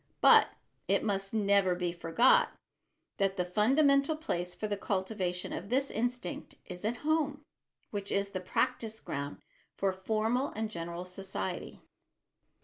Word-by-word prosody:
But - - +7 0.4
it - - +2
must 195 -2 -1
never 200 -4 +3
be 175 -1 -1
forgot 175 +9 +3 0.6
that 195 0 +1
the 180 - +1
fundamental 275 - +3
place 180 - -3
for - - -4
the 205 - -1
cultivation 190 -2 -2
of 190 +4 -5
this 270 +3 +1
instinct 240 -4 -3
is 180 +1 -8
at 230 +3 -1
home, 300 -2 +1 0.5
which 200 -1 -4
is 200 0 0
the 185 - -3
practise 220 +4 -1
ground 140 +1 -5 0.3
for 195 -1 +1
formal 220 +7 0
and 220 0 -2
general 170 0 -5
society. 185 - -5
200 Hz, 140 wpm, -31 LUFS, 180-235 Hz, 0.6 s, But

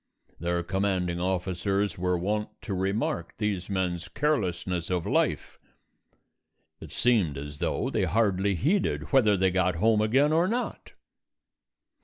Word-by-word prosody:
Their 85 +1 -1
commanding 90 -1 -1
officers 95 +2 -1
were 90 0 0
wont 105 +4 -1
to 105 - -4
remark 95 -2 -2
these 105 -4 -2
men's 90 -3 -2
carelessness 90 - -1
of 90 -2 -1
life. - - 0 1.2
It 80 - -10
seemed 105 - +2
as 75 +1 -7
though - - -1
they - - +1
hardly 100 -3 +1
heeded 175 - 0
whether 110 -7 +5
they 95 0 +2
got 90 -1 +1
home 110 +5 +3
again 135 +8 +3
or 170 +3 +3
not. 240 +4 -3
95 Hz, 130 wpm, -27 LUFS, 90-110 Hz, 1.2 s, whether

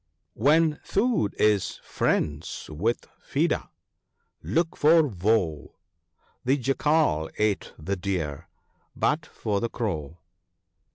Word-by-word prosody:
When 150 +6 +3
Food 210 - +1
is 100 -4 +2
friends 75 0 -1
with 105 +10 -1 0.2
Feeder, - - 0 0.8
look 165 - 0
for 160 +2 +5
Woe, 95 - 0 0.7
The 135 +3 +2
Jackal 135 - +1
ate 105 -2 0
the 95 +6 -2
Deer, 90 -7 -3 0.5
but 150 0 0
for 105 -3 -2
the 115 - -1
Crow." 85 - -3
105 Hz, 100 wpm, -26 LUFS, -, 0.8 s, for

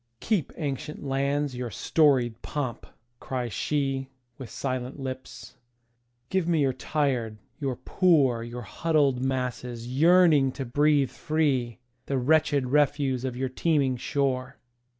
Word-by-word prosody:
"Keep, 205 - -1
ancient 145 0 -4
lands, 140 0 -1
your 125 -1 -4
storied 125 - +2
pomp!" 130 -6 -4 0.3
cries 125 -3 -4
sheWith 135 -1 -3
silent 130 +1 -4
lips. 130 -1 -7 0.7
"Give 185 -3 +1
me 165 -3 +2
your 135 -2 +2
tired, 125 -5 -1 0.2
your 135 -4 -2
poor, 140 -8 +2
Your 120 +1 -6
huddled 145 -1 +1
masses 125 -2 -3
yearning 150 0 +4
to 135 - -5
breathe 145 +1 +2
free, 140 -7 0 0.3
The 135 - 0
wretched 145 0 +2
refuse 140 -3 +2
of 130 -2 -3
your 130 0 -1
teeming 140 -1 +1
shore. 130 0 -2
135 Hz, 120 wpm, -27 LUFS, 125-150 Hz, 0.7 s, yearning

